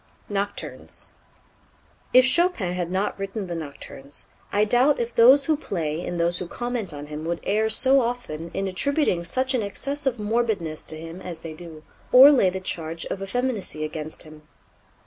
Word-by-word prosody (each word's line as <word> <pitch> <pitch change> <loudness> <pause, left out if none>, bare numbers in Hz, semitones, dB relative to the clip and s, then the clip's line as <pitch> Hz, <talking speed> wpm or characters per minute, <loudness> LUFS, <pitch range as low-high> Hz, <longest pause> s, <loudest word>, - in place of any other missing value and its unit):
Nocturnes. 205 0 -4 1.0
If 255 0 +7
Chopin 265 - +3
had 175 -1 -2
not 190 +2 -1
written 195 +1 -4
the 175 - -5
Nocturnes 145 -3 -8 0.2
I 205 +1 +3
doubt 250 +7 +3
if 235 0 -2
those 265 +4 +7
who 315 - +2
play 165 - -3
and 175 -1 -4
those 170 +1 +1
who 180 - -4
comment 240 -2 -3
on 145 -1 -7
him 150 +1 -7
would 170 +1 -2
err 215 +2 +1
so 265 +5 +5
often 230 -10 -4
in 195 0 -1
attributing 195 - 0
such 260 +8 -1
an 250 - +1
excess 275 +8 -4
of 250 -2 0
morbidness 210 -7 -1
to 155 - -3
him 165 +3 -9
as 170 -3 -7
they 165 -1 -7
do, 155 -1 -11 0.3
or 265 +3 +10
lay 245 -10 +4
the 190 +1 -4
charge 165 -3 -4
of 195 - -4
effeminacy 205 -6 -2
against 155 0 -5
him. 155 -1 -13
195 Hz, 175 wpm, -24 LUFS, 165-245 Hz, 1.0 s, or